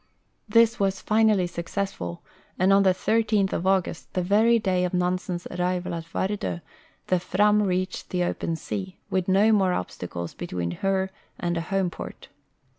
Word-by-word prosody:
This 230 +2 +4
was 195 -1 +1
finally 215 -3 +3
successful, 170 - -4 0.3
and 190 +2 +4
on 200 - +6
the 195 - +5
13th 210 +1 +1
of 180 - -1
August, 190 -3 0
the 180 - +1
very 220 +5 +4
day 185 -4 +1
of 180 0 -1
Nansen's 180 0 -1
arrival 180 0 -1
at 165 -1 -5
Vard5, 165 - -2 0.4
the 185 - +2
Fram 210 +4 +3
reached 185 -1 -1
the 180 -1 0
open 170 -1 -2
sea, 185 +3 -5
with 185 -2 0
no 200 +4 +4
more 190 -4 +3
ob 90 - -3
stacles 85 -1 -6
between 85 -1 -4
her 190 0 +1 0.3
and 175 0 -1
a 165 - -1
home 190 +1 -1
port. - - -9
185 Hz, 165 wpm, -25 LUFS, 175-200 Hz, 0.4 s, on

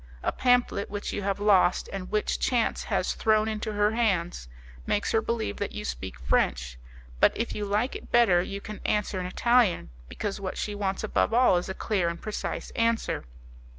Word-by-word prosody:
A - - +1
pamphlet 245 -5 +2
which 205 0 -4
you 205 - -2
have 200 0 -1
lost, 195 -3 +3
and 190 -2 -5
which 210 0 0
chance 240 -3 0
has - - 0
thrown 215 0 +2
into 215 0 -3
her 205 0 +2
hands, 185 - 0 0.4
makes 205 - 0
her 225 - +3
believe 225 - -2
that - - -3
you 70 - -5
speak 60 -1 -5
French; - - 0 0.4
but, - - +6
if 230 - -2
you 210 - -3
like 210 +6 0
it - - -9
better, 220 -8 +5
you 200 +2 -5
can 210 -1 -8
answer 210 -2 0
in 180 - -3
Italian, 210 - +2 0.2
because 205 -1 -4
what 185 -1 -4
she 210 - -2
wants 195 -1 -2
above 215 +1 +1
all 250 -6 +5
is 175 - -3
a 190 - -4
clear 190 -6 0
and 170 0 -5
precise 215 - -4
answer. 230 0 0
205 Hz, 190 wpm, -27 LUFS, 180-220 Hz, 0.4 s, but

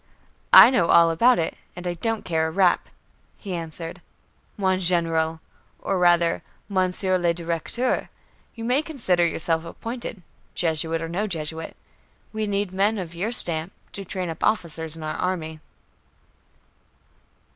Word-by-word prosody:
"I - - +10
know 175 -10 +2
all 170 -1 +6
about 240 +9 +4
it, 165 - -1 0.2
and 180 0 -8
I 175 - -1
don't 225 +5 -3
care 160 -2 0
a - - -2
rap," 180 +1 +2 0.5
he 195 -3 -7
answered. 165 -1 -6 0.6
"Mon 190 -2 +1
Général, 165 -3 0 0.4
or 195 -2 -2
rather, 175 -1 +3 0.3
Monsieur 185 -1 +1
le 170 -1 +1
Directeur, 170 +9 -2 0.5
you 230 - -7
may 250 +5 +2
consider 230 - 0
yourself 165 0 -1
appointed, 225 +2 -6 0.3
Jesuit 165 0 0
or - - -3
no 190 +6 -2
Jesuit. 160 -3 -4 0.6
We 215 -1 -2
need 200 -1 -1
men 200 +4 +1
of 175 -4 -6
your 190 +7 -2
stamp 170 -5 0 0.2
to 200 - -7
train 185 -2 -4
up 160 - -8
officers 165 -6 -1
in 160 - -8
our 155 - -4
army." 160 -4 -3
175 Hz, 145 wpm, -24 LUFS, 165-200 Hz, 0.6 s, I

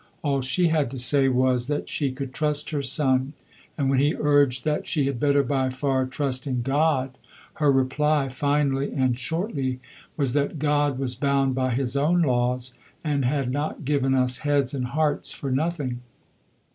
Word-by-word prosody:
All 140 -3 0
she 170 +7 +1
had 155 -5 +1
to 135 - -7
say 135 +2 +4
was 125 -1 +1
that 145 0 -2
she 140 -3 -1
could 130 0 -6
trust 150 +2 -1
her 145 -2 -1
son; 130 0 +1 0.4
and 140 -3 0
when 135 -1 +2
he 145 +3 +2
urged 145 -4 +2
that 150 -1 -1
she 145 -4 0
had 135 -3 -2
better 140 0 +3
by 130 -1 0
far 130 0 -1
trust 130 -1 -3
in 125 -3 -1
God, 135 -1 0 0.4
her 145 -2 +5
reply, 135 +2 +1
finally 140 0 0
and 130 -3 +1
shortly, 135 - -3 0.4
was 135 -5 0
that 145 +2 0
God 145 -2 +1
was 130 -2 0
bound 140 -1 +1
by 130 -2 0
His 130 0 -2
own 165 +5 +2
laws 125 -1 0 0.3
and 145 -3 0
had 135 -1 0
not 145 +2 -3
given 135 -2 +1
us 125 -1 +1
heads 145 -3 0
and 130 -3 -2
hearts 150 +3 0
for 135 - -5
nothing. 140 -3 -1
135 Hz, 175 wpm, -24 LUFS, 130-145 Hz, 0.4 s, her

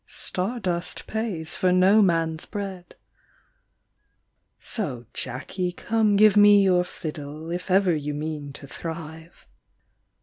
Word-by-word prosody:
Star 200 +7 -3
dust 180 -3 -3
pays 200 -8 -3
for 185 - +2
no 190 +4 +5
man 165 -4 +2
s 160 - -7
bread. 195 -4 -6 1.6
So, 135 - -3
Jacky, 145 +8 -3
come 220 +1 +1
give 210 0 +6
me 205 -1 +7
your 180 -2 +3
fiddle 155 -1 -7
If 180 +2 -4
ever 185 -2 +3
you 150 -1 -3
mean 150 -1 -5
to 140 - -10
thrive." 160 +2 -8
180 Hz, 125 wpm, -25 LUFS, 155-200 Hz, 1.6 s, me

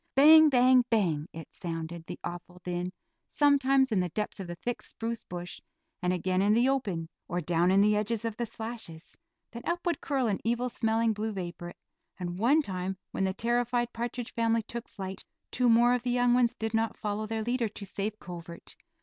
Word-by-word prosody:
"Bang, 310 +3 +9
bang, 255 -1 +5
bang," 170 -9 +1
it 165 0 -10
sounded, 165 -1 -5
the - - -6
awful 175 +1 -7
din, 180 0 -3 0.4
sometimes 275 -2 +3
in 205 - +2
the 180 -1 0
depths 210 +4 -3
of 190 - -5
the 175 - -5
thick 240 +7 -4
spruce 230 0 -5
bush, 175 0 -7 0.4
and 180 0 +1
again 185 +1 0
in 205 +2 +4
the 240 +3 +4
open, 200 -12 -1 0.2
or 175 - -2
down 170 +1 +2
in 195 +1 +5
the 210 +1 +4
edge 210 +1 0 0.2
of 225 -2 -2
the 235 +1 -3
slashes; 220 -8 -7 0.4
then 235 - -7
up 345 +1 -1
would 345 -4 0
curl 270 -3 0
an 205 -4 0
evil 240 +2 0
smelling 225 -1 +1
blue 215 +1 -3
vapor, 175 -2 -6 0.4
and 175 0 -4
one 280 +8 +4
time 190 -3 -3
when 195 - 0
the 190 - 0
terrified 240 +1 0
partridge 240 +1 -4
family 230 -1 +1
took 235 +2 -6
flight 190 -1 -6 0.3
two 250 -1 +2
more 240 +2 +5
of 250 - +1
the 250 - -2
young 245 0 +3
ones 245 -1 +3
did 220 0 -3
not 225 0 0
follow 210 +1 -3
their 220 0 -2
leader 240 0 0
to 205 0 -7
safe 205 +2 -3
covert. 170 -3 -8
220 Hz, 200 wpm, -29 LUFS, 180-240 Hz, 0.4 s, Bang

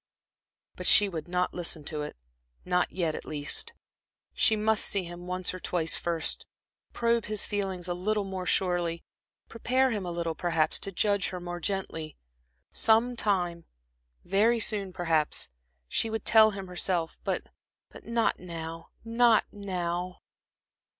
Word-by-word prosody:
But - - -3
she 205 - +9
would 165 -5 -5
not 180 +1 0
listen 170 -3 -1
to 150 +1 -3
it 150 - -6 0.5
not 180 0 +1
yet, 170 -4 -1
at - - -6
least. 150 - -2 0.6
She 220 - +5
must 215 0 +2
see 200 -2 0
him 175 +1 -9
once 185 0 -1
or 185 - -6
twice 170 -2 +1
first, 170 -2 -1 0.4
probe 235 -1 +1
his 215 -1 0
feelings 190 -4 -3
a 175 - -1
little 205 +4 -1
more 190 -2 -5
surely, 175 -3 0 0.4
prepare 255 +3 +1
him 210 -4 -2
a 180 - -4
little, 170 -1 -2
perhaps, 165 -2 +1
to 195 - -4
judge 200 +1 +1
her 180 - -5
more 175 0 -5
gently.... 165 -5 -3 0.5
Some 230 +2 +3
time 175 -6 0 0.6
very 220 +5 +3
soon, 205 -3 0
perhaps, 165 -4 0 0.4
she 225 - 0
would 220 -1 -4
tell 220 -1 +7
him 195 -2 -6
herself, 180 -2 -2
but - - -2 0.5
not 230 -1 0
now, 165 -2 -7 0.2
not 230 -1 +4
now.... 180 -3 -3
185 Hz, 145 wpm, -28 LUFS, 170-210 Hz, 0.6 s, she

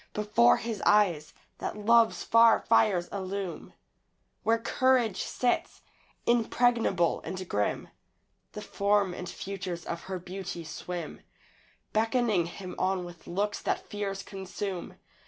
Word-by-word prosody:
Before 210 +3 +4
his 225 -4 -4
eyes 180 -8 +3 0.3
that - - -4
love's 230 +2 +4
far 230 0 +6
fires 190 -6 +3
illume 190 -3 -5 0.7
Where 225 0 +2
courage 240 -3 +2
sits, 245 -1 -1 0.4
impregnable 235 -6 +2
and 185 +2 -5
grim 105 -8 -1 0.7
The 210 - -6
form 200 -2 +1
and 180 0 -6
features 185 -3 -5
of 170 0 -5
her 190 -1 -4
beauty 180 -1 -6
swim, 170 +1 -6 0.7
Beckoning 220 -5 +2
him 180 +1 -8
on 185 -1 0
with 175 -1 -12
looks 205 +3 -2
that - - -2
fears 200 -1 -4
consume. 190 -1 -6
195 Hz, 120 wpm, -29 LUFS, 180-220 Hz, 0.7 s, far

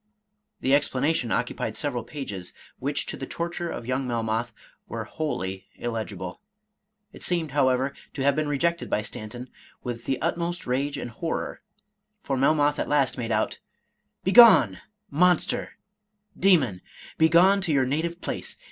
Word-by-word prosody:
The 130 - +2
explanation 140 -2 +2
occupied 115 -2 -1
several 125 -6 -1
pages, 105 -10 -6 0.3
which, - - -1
to - - -5
the - - -6
torture 170 0 -3
of 120 - -5
young 130 +1 -1
Melmoth, 115 0 -1 0.4
were - - -4
wholly 95 - -4
illegible. 110 -6 -5 0.7
It - - -12
seemed, 170 -4 -1
however, 130 -1 +2 0.2
to 135 - -3
have 140 0 +3
been 155 -1 0
rejected 170 +4 0
by 105 - 0
Stanton 115 +4 -7 0.3
with 120 -1 -5
the 135 - -1
utmost 170 0 -2
rage 140 +3 -1
and 120 - -5
horror, - - -4 0.6
for 135 - -1
Melmoth 145 +2 +3
at - - -2
last 140 -3 +2
made 115 -2 -3
out, 110 0 0 0.2
— - - -49
" - - -52
Begone, 190 - +7 0.3
monster, 175 +3 +2 0.6
demon! 145 - +3 0.2
— - - -17
begone 175 +5 +5
to 180 -4 -1
your 135 -3 +3
native 165 +6 -2
place. - - -4
135 Hz, 150 wpm, -26 LUFS, 120-160 Hz, 0.7 s, Begone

